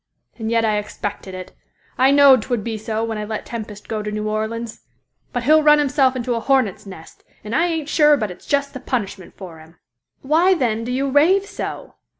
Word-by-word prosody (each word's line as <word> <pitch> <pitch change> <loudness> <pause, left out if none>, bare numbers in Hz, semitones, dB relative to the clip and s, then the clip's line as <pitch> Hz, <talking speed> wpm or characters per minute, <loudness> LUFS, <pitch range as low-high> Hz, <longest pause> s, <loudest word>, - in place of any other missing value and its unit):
And 220 0 -3
yet 230 0 +2
I 210 -1 +1
expected 205 -2 -6
it. 185 -1 -8 0.4
I 260 +1 +4
know'd 280 -3 +6
'twould 240 -2 -3
be 225 0 -4
so 220 +1 -3
when 225 -1 -3
I - - -3
let 215 0 -5
Tempest 215 -3 -8
go 220 -1 -3
to 210 0 -5
New 215 0 -3
Orleans. 220 +2 -4 0.5
But 245 - -3
he'll 310 +5 +5
run 300 0 +6
himself 275 -2 +2
into 245 -1 -2
a 230 - -1
hornet's 230 -6 0
nest, 175 -4 -12 0.2
and 215 +2 -4
I 335 +2 +3
ain't 320 -4 -3
sure 300 -1 +4
but 215 -6 -3
it's 180 - -14
just 280 0 0
the 260 - -6
punishment 205 -8 -4
for 175 -5 -10
him." 160 +2 -17 0.5
"Why, 335 +7 +3
then, 230 -7 -1
do 245 - -4
you 270 +2 -1
rave 355 +8 +4
so?" - - -7
230 Hz, 210 wpm, -20 LUFS, 215-280 Hz, 0.5 s, know'd